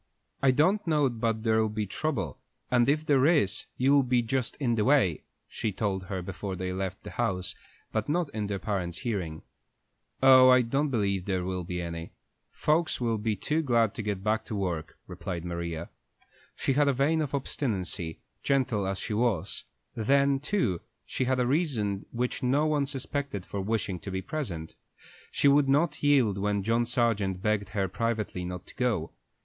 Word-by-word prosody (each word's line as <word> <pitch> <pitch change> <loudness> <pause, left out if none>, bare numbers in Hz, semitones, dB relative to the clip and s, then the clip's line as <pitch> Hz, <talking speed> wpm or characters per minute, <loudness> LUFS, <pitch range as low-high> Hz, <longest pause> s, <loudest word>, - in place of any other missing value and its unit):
"I 135 - +5
don't 170 +10 +3
know 150 -4 +3
but 115 -2 -1
there'll 110 -1 +2
be 105 0 -2
trouble, 100 - -3 0.3
and 125 0 +4
if 155 +2 +1
there 140 -2 +4
is, 150 - +2
you'll 140 +2 +5
be 125 -2 +2
just 125 +1 -1
in 125 -5 0
the 110 -2 +1
way," 115 - +3 0.2
she 110 -3 -3
told 95 -1 -2
her 95 -1 -4
before 95 +1 -5
they 90 0 -3
left 95 0 -4
the - - -8
house, 95 -6 -1 0.4
but 110 +2 -2
not 170 +2 +1
in 105 -2 -2
their 100 -1 -2
parents' 95 -5 -3
hearing. 95 -10 -3 0.8
"Oh, 130 -1 +9
I 125 -1 +6
don't 135 +6 0
believe 100 -7 0
there'll 95 -1 -2
be 90 0 -4
any. 85 0 -6 0.4
Folks 155 +2 +1
will 115 -3 0
be 110 0 0
too 155 +9 0
glad 115 -7 +2
to - - -4
get 100 -3 -3
back 110 +1 +1
to 110 - -5
work," 90 -5 -3
replied 90 -2 -5
Maria. 85 -1 -4 0.6
She 135 - 0
had 145 +2 +3
a 140 - +4
vein 150 +5 +2
of 145 -2 -2
obstinacy, 95 - -3 0.2
gentle 125 -8 +1
as 95 0 -2
she 105 - -4
was; 110 -6 0 0.3
then, 140 +4 +3
too, 145 - 0 0.2
she 130 - -2
had 130 0 +1
a 125 - +2
reason 120 - 0
which 125 +1 -2
no 135 +4 +2
one 150 -3 +1
suspected 135 -6 -4
for 100 - -4
wishing 100 -3 -1
to 100 - -7
be 95 0 -3
present. 105 - -4 0.6
She - - +2
would 140 0 +5
not 150 +2 +2
yield 130 -9 +3
when 100 0 0
John 115 +3 +1
Sargent 105 -6 0
begged 105 -2 0
her 100 -3 -1
privately 110 -2 -2
not 90 0 -6
to - - -13
go. 110 -11 -1
110 Hz, 180 wpm, -28 LUFS, 95-135 Hz, 0.8 s, Oh